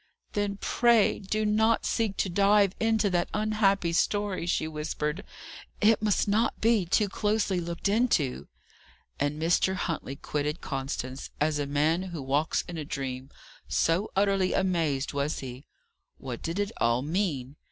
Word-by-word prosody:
"Then 205 Hz, -1 st, -1 dB
pray 235 Hz, -1 st, +3 dB
do 215 Hz, +2 st, -1 dB
not 220 Hz, +2 st, +2 dB
seek 215 Hz, -4 st, 0 dB
to -, -, +1 dB
dive 200 Hz, +1 st, +3 dB
into 220 Hz, -2 st, +2 dB
that 175 Hz, -1 st, 0 dB
unhappy 210 Hz, -5 st, +1 dB
story," 200 Hz, -1 st, 0 dB
she 155 Hz, -, 0 dB
whispered. 150 Hz, +2 st, -3 dB, 0.6 s
"It 215 Hz, 0 st, +4 dB
must 210 Hz, -1 st, +1 dB
not 220 Hz, +3 st, +1 dB
be 220 Hz, -5 st, +2 dB
too 210 Hz, +4 st, +2 dB
closely 205 Hz, -1 st, 0 dB
looked 170 Hz, +2 st, -3 dB
into." 200 Hz, -, +1 dB, 0.7 s
And 145 Hz, +2 st, -1 dB
Mr. 175 Hz, +3 st, +2 dB
Huntley 165 Hz, -6 st, -3 dB
quitted 150 Hz, +3 st, -3 dB
Constance, 135 Hz, -1 st, -4 dB
as 150 Hz, 0 st, +1 dB
a 145 Hz, -, -1 dB
man 150 Hz, +5 st, +1 dB
who 175 Hz, -6 st, -6 dB
walks 140 Hz, +4 st, 0 dB
in 170 Hz, -2 st, -5 dB
a -, -, -3 dB
dream, 135 Hz, -2 st, -5 dB, 0.4 s
so 175 Hz, +6 st, +1 dB
utterly 195 Hz, -1 st, +2 dB
amazed 160 Hz, -8 st, 0 dB
was 140 Hz, +2 st, -1 dB
he. 130 Hz, +1 st, -8 dB, 0.5 s
What -, -, -6 dB
did 165 Hz, +2 st, -3 dB
it 205 Hz, +1 st, -1 dB
all 120 Hz, +2 st, +2 dB
mean? 150 Hz, -5 st, -2 dB
175 Hz, 150 wpm, -28 LUFS, 150-205 Hz, 0.7 s, It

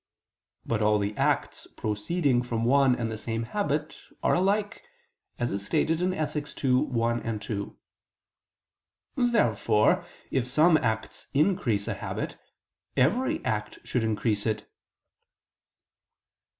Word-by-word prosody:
But 115 Hz, -2 st, -1 dB
all 105 Hz, 0 st, +4 dB
the 105 Hz, 0 st, -2 dB
acts -, -, 0 dB
proceeding 120 Hz, -, +1 dB
from 115 Hz, -2 st, -2 dB
one 135 Hz, 0 st, +4 dB
and 115 Hz, -2 st, -2 dB
the 110 Hz, -, -5 dB
same 115 Hz, 0 st, -3 dB
habit 155 Hz, -, -2 dB, 0.2 s
are -, -, +3 dB
alike 205 Hz, +4 st, +1 dB, 0.6 s
(Ethic. 150 Hz, -, -1 dB
ii, 130 Hz, -2 st, +3 dB
1, 115 Hz, -3 st, 0 dB
2). 105 Hz, -1 st, -5 dB, 1.4 s
Therefore 120 Hz, -, +3 dB, 0.3 s
if 130 Hz, -2 st, 0 dB
some 155 Hz, +5 st, +5 dB
acts 110 Hz, -6 st, -2 dB
increase 140 Hz, -, +2 dB
a -, -, 0 dB
habit, -, -, -4 dB, 0.6 s
every 255 Hz, -, +2 dB
act 330 Hz, -, -2 dB
should 125 Hz, -, -1 dB
increase 110 Hz, -1 st, 0 dB
it. 110 Hz, -1 st, -2 dB
120 Hz, 105 wpm, -27 LUFS, 110-160 Hz, 1.4 s, some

